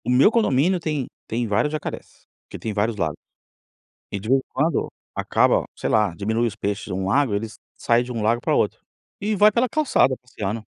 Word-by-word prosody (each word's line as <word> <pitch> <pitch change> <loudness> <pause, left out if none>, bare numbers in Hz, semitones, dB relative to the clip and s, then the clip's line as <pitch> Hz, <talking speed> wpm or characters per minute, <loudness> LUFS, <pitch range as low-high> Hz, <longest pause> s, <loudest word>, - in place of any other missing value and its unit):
O 120 - -4
meu 130 - +5
condomínio 180 - +2
tem 150 -6 -2 0.2
tem 115 +1 -1
vários 110 +8 +1
jacarés, 155 -1 -6 0.2
porque - - -10
tem 110 - -4
vários 105 +2 0
lagos, 80 -6 -1 1.0
e 100 - -3
de 110 - -8
vez 135 +2 +5
em - - -15
quando, 150 +2 0 0.3
acaba, - - +2
sei - - -2
lá, 105 -4 +2
diminui 110 +5 0
os 105 - -7
peixes 100 -2 -2
de - - -6
um 95 +1 -2
lago, 135 +3 +2
eles 110 +2 -3 0.2
saem 120 +1 +2
de 125 - -6
um 115 - -3
lago 115 +3 +2
para - - +1
outro, - - +1 0.4
e 215 +2 0
vai 210 +2 +6
pela 240 +4 +2
calçada 290 - +3
passeando. 110 -3 -5
120 Hz, 205 wpm, -23 LUFS, 105-150 Hz, 1.0 s, vai